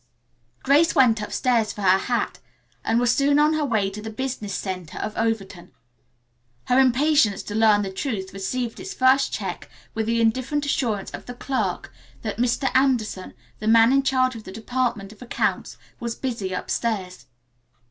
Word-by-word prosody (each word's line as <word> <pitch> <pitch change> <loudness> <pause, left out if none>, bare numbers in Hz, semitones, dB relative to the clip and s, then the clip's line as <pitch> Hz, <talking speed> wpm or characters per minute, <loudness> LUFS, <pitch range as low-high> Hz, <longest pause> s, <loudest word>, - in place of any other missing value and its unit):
Grace 295 +5 +4
went 230 -4 +4
upstairs 225 0 0
for 205 - -7
her 190 0 +5
hat 240 +3 -2 0.4
and 225 - +2
was 245 0 +3
soon 285 +1 +3
on 300 +1 +4
her 310 -1 0
way 220 -8 +1
to 200 +2 -6
the 220 - -6
business 225 -3 -4
center 185 -4 -5
of 215 - -4
Overton. 200 -6 -3 0.9
Her 250 +1 +3
impatience 265 -4 +3
to 205 - -7
learn 215 -1 +4
the 195 - -4
truth 190 -3 -4
received 225 +5 -3
its - - -7
first 260 +1 +3
check - - -5 0.2
with 220 -1 -2
the 230 0 +1
indifferent 260 +6 0
assurance 230 -8 -1
of - - -9
the 245 - -7
clerk 265 +1 -3 0.3
that 215 -3 -4
Mr. 245 +3 +1
Anderson, 245 -8 +1 0.2
the 215 - -4
man 230 +2 +6
in 275 - +4
charge 255 -2 +1
of 225 - -9
the 190 - -9
department 225 -2 -2
of 215 - -22
accounts, 245 - -2 0.2
was 235 -1 -4
busy 230 -8 -4
upstairs. 185 - -3
230 Hz, 170 wpm, -23 LUFS, 205-260 Hz, 0.9 s, man